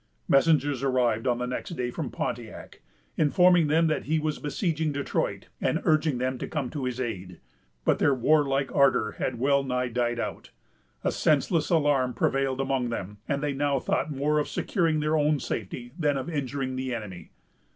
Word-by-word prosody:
Messengers 145 -2 +3
arrived 125 -3 +1
on 120 -1 +2
the 125 - -2
next 125 - -4
day 125 -1 -2
from - - -4
Pontiac, - - -6 0.4
informing 175 +1 +4
them 160 +3 +3
that 155 -1 0
he 160 +2 +1
was 155 -1 -2
besieging 155 0 -1
Detroit, 140 -1 -2
and - - +1
urging 155 -3 +2
them 130 0 -2
to - - -4
come 140 -6 -3
to 140 -4 -4
his 125 0 -3
aid. 95 -8 -5 0.5
But - - +3
their 145 - +4
warlike 140 +1 +2
ardor 135 -6 +3
had 125 - -1
well 140 +3 +3
nigh 125 -1 -1
died 120 0 -1
out. - - -5 0.5
A - - +1
senseless 155 +2 +1
alarm 145 -6 +2
prevailed 135 -1 0
among 135 -2 0
them, 105 -3 -5
and 140 0 -1
they 145 -1 0
now 140 0 +1
thought 135 - -1
more 150 +1 +1
of 150 - -1
securing 165 -6 0
their 155 +1 +1
own 150 -1 +2
safety 120 +2 -5
than 145 -3 +2
of 135 +6 -4
injuring 135 -3 -3
the 130 -1 -2
enemy. 100 -6 -8
135 Hz, 180 wpm, -27 LUFS, 125-150 Hz, 0.5 s, informing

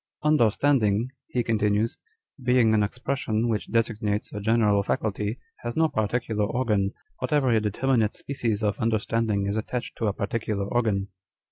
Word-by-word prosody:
" - - -36
Understanding," 120 -3 +3 0.2
he 125 - -1
continues, 110 0 +1 0.2
" 155 - -21
being 125 -3 +4
an 110 - +4
expression 120 0 -1
which 110 -3 -1
designates 110 -2 0
a 105 - -4
general 105 -2 +3
faculty, 105 +2 -1 0.2
has 120 - -5
no 160 0 +3
particular 110 -2 -1
organ, 105 -4 0 0.3
but - - -3
every 130 -6 +3
determinate 110 +1 +1
species 115 -6 -2
of 105 -1 0
understanding 110 -2 0
is 100 +2 -1
attached 120 +3 -4
to 115 - +1
a 100 - +1
particular 105 -1 -2
organ. 100 -3 0
110 Hz, 150 wpm, -26 LUFS, 105-120 Hz, 0.3 s, being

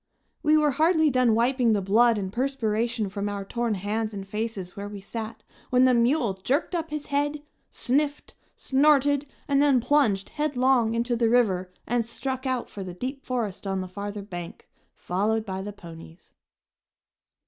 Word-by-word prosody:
We 305 0 +4
were 300 -1 +3
hardly 315 +1 +3
done 250 -3 +3
wiping 240 0 +2
the 205 - +2
blood 225 +4 +4
and 190 -1 -4
perspiration 235 -4 -1
from 200 +1 -3
our 200 -1 -4
torn 235 +1 -1
hands 210 +3 -2
and 195 -1 -6
faces 210 -3 -4
where 205 0 -6
we 205 -1 -7
sat 220 +3 -7 0.3
when 250 0 +4
the 255 -1 +5
mule 240 -1 +2
jerked 255 - -1
up 330 -2 -2
his 300 -1 -4
head, 290 +1 0 0.3
sniffed, 285 +3 -1 0.2
snorted 285 0 +3 0.2
and 280 -1 +3
then 280 -3 +4
plunged 245 -7 +2
headlong 255 -6 +1
into 240 +1 0
the 230 -1 +2
river 190 -7 +2
and 240 0 +1
struck 260 +3 -4
out 255 -2 -1
for 200 - -7
the 180 -2 -7
deep 265 +7 -5
forest 225 -6 -3
on 195 -1 -1
the 185 - -5
farther 205 +2 -6
bank, 175 -4 -8 0.3
followed 215 +5 -1
by 190 -2 -4
the 205 +2 -5
ponies. 165 -3 -13
235 Hz, 170 wpm, -26 LUFS, 200-270 Hz, 0.3 s, the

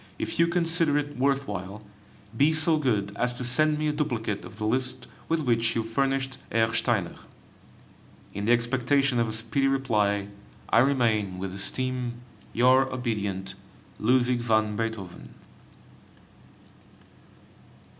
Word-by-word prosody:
If - - -3
you 170 - +5
consider 165 -3 +1
it 145 0 -3
worth 135 +1 0
while, 100 +1 -6 0.5
be 145 +6 +3
so 160 0 +3
good 105 -8 -1
as 125 +3 0
to 125 - -5
send 150 +5 +4
me 155 0 -1
a - - +2
duplicate 120 -9 -2
of - - -11
the 110 - -3
list 125 +3 -1 0.2
with 165 0 +1
which 115 -4 +1
you 115 - 0
furnished 135 +3 -1
Herr 115 0 +2
Steiner. 110 -6 +1 1.2
In 100 +1 -4
the 115 - +2
expectation 125 +2 +2
of 115 -1 +1
a - - -4
speedy 135 +5 0
reply, 105 -7 0 0.4
I - - +5
remain, 115 -7 +1
with 95 0 -5
esteem, 125 +4 -3 0.3
Your 130 +2 +3
obedient 105 -6 -3 0.5
LUDWIG 125 +1 +2
VAN 110 -3 +1
BEETHOVEN. 110 -5 -5
120 Hz, 135 wpm, -26 LUFS, 110-135 Hz, 1.2 s, you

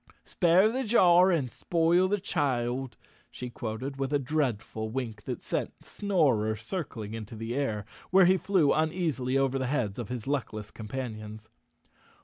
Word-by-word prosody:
"Spare 185 +4 +4
the 260 +3 -1
jar 185 -5 +5
and 145 -9 0
spoil 170 +5 +2
the 205 +2 0
child," 130 - -1 0.3
she 125 -1 -7
quoted 120 +5 -5
with 135 0 -1
a 145 - +3
dreadful 125 -6 -2
wink 115 -3 -5
that - - -5
sent - - -4
Snorer 135 - +1
circling 115 - -5
into 110 0 -7
the 115 +2 -4
air, 110 -7 -1 0.2
where 190 0 +6
he 185 +2 +5
flew 185 -6 +2
uneasily 155 -5 0
over 135 0 +1
the 130 - -1
heads 125 -7 -1
of 115 - -5
his 125 -3 -4
luckless 110 -7 -3
companions. 110 -2 -7
135 Hz, 150 wpm, -29 LUFS, 110-170 Hz, 0.3 s, where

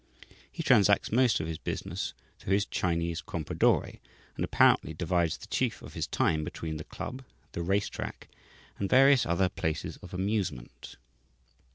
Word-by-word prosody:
He 165 - -5
transacts 105 -8 +4
most 120 0 +3
of 80 - -2
his 80 -1 -5
business - - -4 0.2
through 95 - -1
his 100 +2 +2
Chinese 85 -1 -1
"Compradore," 80 -2 0 0.4
and - - -2
apparently 80 - +3
divides 85 -1 0
the - - -11
chief - - -1
of - - -10
his - - -3
time 80 -1 +1
between 80 0 -5
the 75 - -6
club, 130 - -7 0.3
the 85 - -4
race 95 +4 +1
track, - - -7 0.5
and 100 - -1
various 135 0 +6
other 90 +2 +2
places 80 -3 -3
of 90 - -12
amusement. 100 +2 -3
90 Hz, 155 wpm, -29 LUFS, 80-105 Hz, 0.5 s, various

